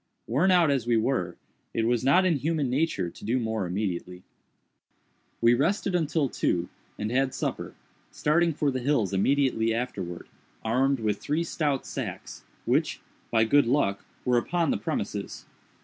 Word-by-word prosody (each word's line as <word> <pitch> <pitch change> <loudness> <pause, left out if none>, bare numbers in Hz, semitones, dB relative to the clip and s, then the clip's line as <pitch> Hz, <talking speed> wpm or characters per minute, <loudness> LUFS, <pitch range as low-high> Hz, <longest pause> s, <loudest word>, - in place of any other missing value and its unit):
Worn 185 +7 +2
out 175 -5 +5
as 130 -4 0
we 120 -1 +3
were, 110 -7 0 0.4
it 115 - +1
was 120 0 +1
not 140 +8 +4
in 170 -5 +3
human 145 -2 -1
nature 135 - 0
to - - -15
do 115 +5 +1
more 110 -5 -1
immediately. 90 -1 -3 1.2
We 115 +1 +6
rested 185 - +1
until 160 -4 +1
two, 90 -7 -1 0.3
and 105 +1 -3
had 130 +1 +1
supper; - - -3 0.3
starting 170 +3 +2
for 145 -2 0
the 130 - -2
hills 120 -7 +1
immediately 115 +1 +2
afterwards, 90 -8 -4 0.4
armed 130 +4 +2
with 105 -2 0
three 155 +3 -1
stout 150 -5 -1
sacks, - - -6 0.2
which, - - +1 0.3
by 115 -1 +3
good 140 +3 +4
luck, 115 -7 +1 0.2
were 125 -1 +4
upon 170 +4 0
the - - +1
premises. - - -4
130 Hz, 155 wpm, -27 LUFS, 110-150 Hz, 1.2 s, We